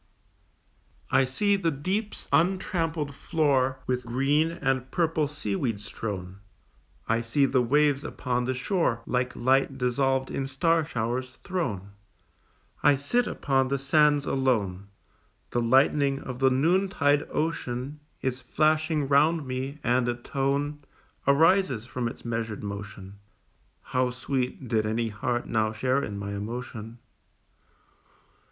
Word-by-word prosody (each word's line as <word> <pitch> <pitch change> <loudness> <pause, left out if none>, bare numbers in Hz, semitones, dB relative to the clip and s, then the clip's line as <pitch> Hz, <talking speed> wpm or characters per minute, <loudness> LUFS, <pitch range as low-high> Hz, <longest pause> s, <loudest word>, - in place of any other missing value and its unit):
I 135 - +4
see 200 +11 +1
the 175 -4 +1
deep's 190 +9 -3
untrampled 165 -4 +1
floor 140 -4 +1
With 125 -1 -1
green 135 +6 +2
and 135 -6 -1
purple 160 -1 +1
seaweeds 110 -6 -3
strown; 95 -4 -5 0.7
I 115 +1 +2
see 120 +5 +2
the 130 -1 +2
waves 145 +3 +2
upon 125 -2 -2
the 130 +1 -1
shore, 125 - 0
Like 125 0 -1
light 135 +2 +2
dissolved 130 +1 +1
in 135 - -2
star 165 +5 +2
showers, 125 -2 -3
thrown: 120 - -3 0.9
I 145 - +5
sit 215 - 0
upon 135 -1 +1
the 140 +1 0
sands 145 +1 +3
alone, 105 -8 0 0.6
The 120 - +1
lightning 135 +3 +3
of 125 -1 -6
the 135 0 +5
noontide 145 0 +2
ocean 145 -3 -2 0.2
Is 130 0 -2
flashing 155 +2 +1
round 150 +3 +3
me, 130 +3 -4
and 125 0 +2
a 120 - 0
tone 140 +4 -1 0.5
Arises 155 - +4
from 125 0 -3
its 115 - -8
measured 115 -2 -3
motion, 100 -1 -7 0.6
How 125 0 0
sweet! 130 0 -3
did 110 -2 +1
any 115 +1 0
heart 120 +3 -2
now 110 -1 +1
share 130 +5 +1
in 100 - -4
my 100 0 -5
emotion. 115 +2 -6
130 Hz, 125 wpm, -27 LUFS, 120-150 Hz, 0.9 s, I